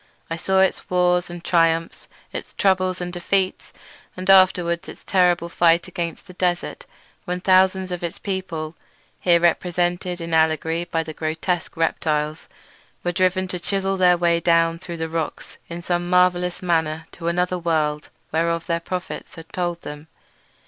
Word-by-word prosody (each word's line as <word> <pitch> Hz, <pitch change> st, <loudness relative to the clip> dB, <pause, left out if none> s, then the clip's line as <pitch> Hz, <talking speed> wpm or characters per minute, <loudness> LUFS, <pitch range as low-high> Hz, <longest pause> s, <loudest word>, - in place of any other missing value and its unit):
I -, -, 0 dB
saw 190 Hz, +3 st, +2 dB
its 190 Hz, -, +1 dB
wars 180 Hz, 0 st, +2 dB
and 175 Hz, 0 st, -8 dB
triumphs, 165 Hz, -1 st, +1 dB, 0.3 s
its -, -, -6 dB
troubles 185 Hz, -2 st, +1 dB
and 175 Hz, 0 st, -4 dB
defeats, 185 Hz, +2 st, -1 dB, 0.5 s
and 185 Hz, 0 st, -5 dB
afterward 185 Hz, -2 st, +4 dB
its -, -, -11 dB
terrible 180 Hz, -2 st, +2 dB
fight 170 Hz, 0 st, +3 dB
against 170 Hz, -3 st, -4 dB
the 180 Hz, -, -12 dB
desert 180 Hz, -1 st, -2 dB, 0.4 s
when 180 Hz, -1 st, -2 dB
thousands 185 Hz, 0 st, +3 dB
of 180 Hz, -, -3 dB
its 170 Hz, -, -3 dB
people—here 170 Hz, -1 st, -2 dB
represented 175 Hz, +1 st, 0 dB
in 165 Hz, -1 st, -5 dB
allegory 160 Hz, +1 st, +2 dB
by 165 Hz, -2 st, -1 dB
the 160 Hz, -, -7 dB
grotesque 160 Hz, +3 st, -2 dB
reptiles—were 155 Hz, +2 st, -3 dB
driven 185 Hz, +1 st, +1 dB
to 180 Hz, -, -2 dB
chisel 195 Hz, +2 st, 0 dB
their 180 Hz, -2 st, +4 dB
way 170 Hz, -1 st, +2 dB
down 165 Hz, 0 st, +2 dB
through 170 Hz, -1 st, -7 dB
the 160 Hz, 0 st, -2 dB
rocks 160 Hz, -1 st, -4 dB
in 170 Hz, 0 st, -6 dB
some 175 Hz, 0 st, -1 dB
marvellous 180 Hz, 0 st, +2 dB
manner 160 Hz, -2 st, 0 dB
to 170 Hz, -, -7 dB
another 180 Hz, +1 st, 0 dB
world 155 Hz, -3 st, 0 dB, 0.2 s
whereof 165 Hz, +1 st, 0 dB
their 170 Hz, -1 st, 0 dB
prophets 180 Hz, +1 st, -6 dB
had 165 Hz, 0 st, -12 dB
told 175 Hz, -1 st, -2 dB
them. 150 Hz, +1 st, -8 dB
175 Hz, 150 wpm, -22 LUFS, 165-180 Hz, 0.5 s, afterward